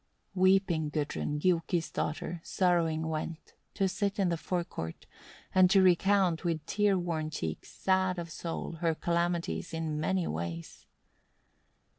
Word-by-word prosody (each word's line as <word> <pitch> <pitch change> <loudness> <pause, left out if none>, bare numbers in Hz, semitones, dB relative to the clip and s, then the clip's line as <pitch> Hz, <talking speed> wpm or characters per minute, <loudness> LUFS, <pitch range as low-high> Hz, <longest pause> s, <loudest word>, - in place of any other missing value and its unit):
9. 185 - -3
Weeping 185 -5 +3
Gudrun, 150 0 -2
Giuki's 170 0 +1
daughter, 165 +2 -3
sorrowing 165 -3 +1
went, 160 +1 -5 0.2
to 195 - +2
sit 200 +1 -1
in 195 -3 +2
the 170 - +1
fore 175 +2 -2
court, 80 - -7 0.5
and 185 -1 +6
to 195 0 +5
recount, 185 -1 +3
with 165 -3 -1
tear 205 -2 +2
worn 165 -3 -2
cheeks, 80 - -5
sad 190 -1 +1
of 170 -1 -5
soul, 165 0 -5
her 165 0 +1
calamities, 170 -1 -1
in 160 -2 -2
many 185 +3 0
ways. 85 +1 -5
170 Hz, 140 wpm, -30 LUFS, 155-185 Hz, 0.5 s, and